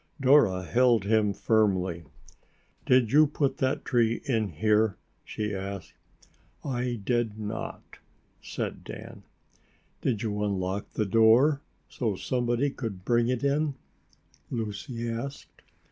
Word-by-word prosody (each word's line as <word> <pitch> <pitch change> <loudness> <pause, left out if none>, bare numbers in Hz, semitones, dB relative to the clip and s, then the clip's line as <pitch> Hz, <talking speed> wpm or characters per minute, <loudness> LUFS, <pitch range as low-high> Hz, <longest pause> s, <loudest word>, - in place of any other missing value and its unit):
Dora 125 -9 +4
held 120 +1 +3
him 105 0 +2
firmly. 95 -5 +1 0.8
"Did 125 -3 +4
you 155 +1 +6
put 140 -1 -1
that 130 0 -1
tree 115 -2 +1
in 115 -5 +1
here?" 105 +4 +1 0.3
she 105 -1 -4
asked. 100 +1 -6 0.7
"I 125 -3 -2
did 120 -2 0
not," 110 +1 -6 0.4
said - - -5
Dan. - - -9 0.8
"Did 115 -4 -1
you 105 -2 -2
unlock 100 -1 -2
the 110 - 0
door 115 +8 +5 0.3
so 110 -5 -2
somebody 125 +5 0
could 100 -9 -6
bring 120 -1 +2
it 125 0 -1
in?" 140 +1 +1 0.7
Lucy 115 +1 -4
asked. 120 +5 -6
115 Hz, 115 wpm, -27 LUFS, 105-125 Hz, 0.8 s, you